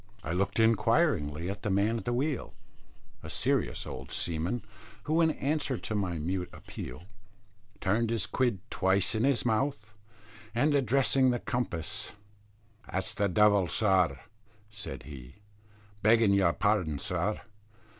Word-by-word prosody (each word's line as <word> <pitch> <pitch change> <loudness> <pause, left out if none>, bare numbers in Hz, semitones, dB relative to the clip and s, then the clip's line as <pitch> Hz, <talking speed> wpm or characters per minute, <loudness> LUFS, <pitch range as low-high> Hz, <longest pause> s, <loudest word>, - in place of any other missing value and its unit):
I - - -3
looked 95 +5 0
inquiringly 110 - +2
at 100 +2 -4
the - - -2
man 105 +4 +2
at 100 - -10
the 120 - 0
wheel, 140 +3 -2 0.7
a - - -8
serious - - -1
old 65 +1 -8
seamen, 85 +8 -2 0.4
who, 160 +2 +2
in 165 - +4
answer 145 -3 -1
to 110 - -5
my 95 -5 -1
mute 90 +3 -2
appeal, 65 +5 -8 0.8
turned 110 +4 +1
his 115 -4 0
quid 120 -8 0
twice 95 +2 +1
in 110 +2 +1
his 135 -3 +2
mouth 110 -2 -1 0.6
and, 145 +5 +3
addressing 135 0 +3
the 125 - +1
compass, 120 -10 -3 0.8
"That's 95 - -2
the 100 -1 0
devil, 100 -1 +4
sir," 90 -5 +2 0.5
said 100 - -7
he, 65 -5 -10 0.7
"begging 110 0 +5
your 95 -4 +3
pardon, 95 -8 +1
sir. - - -2
105 Hz, 135 wpm, -30 LUFS, 90-120 Hz, 0.8 s, begging